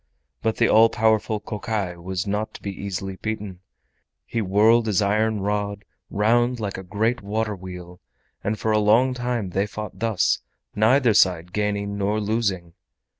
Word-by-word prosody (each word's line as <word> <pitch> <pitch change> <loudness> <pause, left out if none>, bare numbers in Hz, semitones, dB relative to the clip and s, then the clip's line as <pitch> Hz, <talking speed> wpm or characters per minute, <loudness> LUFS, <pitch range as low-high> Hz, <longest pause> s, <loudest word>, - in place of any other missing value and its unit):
But 110 0 0
the - - +4
all 115 +1 +6
powerful 110 -1 +1
Kokai 105 -3 -3
was 90 +2 -4
not 105 +2 -2
to - - -10
be 100 - -3
easily 95 0 -5
beaten—he 105 +2 -7
whirled 110 +4 +4
his 105 -4 +2
iron 105 +1 +1
rod 100 0 -2 0.2
round 120 +4 +2
like 100 -3 -4
a - - -8
great 110 +6 -1
water 105 +1 -2
wheel, 90 -1 -10 0.4
and 110 +1 -1
for 110 +2 -1
a 110 - +3
long 115 +5 +4
time 120 -6 -2
they 100 +3 0
fought 105 0 -7
thus, 105 -5 +1 0.3
neither 115 +3 +4
side 90 -4 +2
gaining 100 -1 -1
nor 105 +2 0
losing. 100 -5 -1
105 Hz, 155 wpm, -23 LUFS, 95-110 Hz, 0.4 s, all